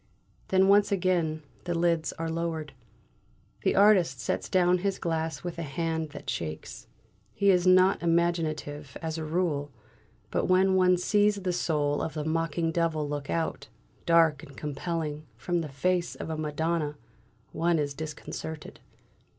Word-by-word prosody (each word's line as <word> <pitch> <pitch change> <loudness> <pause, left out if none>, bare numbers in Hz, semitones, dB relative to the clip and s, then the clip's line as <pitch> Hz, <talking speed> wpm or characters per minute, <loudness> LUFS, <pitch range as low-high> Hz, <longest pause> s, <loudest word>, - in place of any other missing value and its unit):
Then 190 0 +4
once 200 +1 +5
again 175 -5 0 0.2
the 175 -1 -1
lids 165 -2 +1
are 165 - -4
lowered. 160 -3 -3 0.9
The - - +1
artist 190 -10 +5
sets 115 - -2
down 180 -1 +3
his 195 +1 -1
glass 160 -3 -2
with 175 -1 -5
a - - -2
hand 160 +1 -2
that 145 0 -10
shakes. 80 -2 -5 0.5
He 200 0 +4
is 180 -1 +2
not 185 +1 +5
imaginative, 160 -4 -1
as 160 0 -3
a - - -3
rule, 155 -3 -1 0.6
but - - 0
when 190 +1 +4
one 185 -1 +4
sees 205 +3 +3
the 180 -1 0
soul 145 -4 0
of 160 -1 -4
a 150 - -2
mocking 165 +1 0
devil 160 -3 0
look 145 -1 -4
out, 165 -1 -2 0.4
dark 165 -4 +4
and 140 - -13
compelling, 150 0 -4
from 175 +7 -1
the 155 - -5
face 175 +6 0
of 160 - -6
a - - -2
Madonna, 155 0 -1 0.5
one 170 0 +1
is 145 -2 -1
disconcerted. 155 +1 -7
165 Hz, 150 wpm, -28 LUFS, 150-180 Hz, 0.9 s, once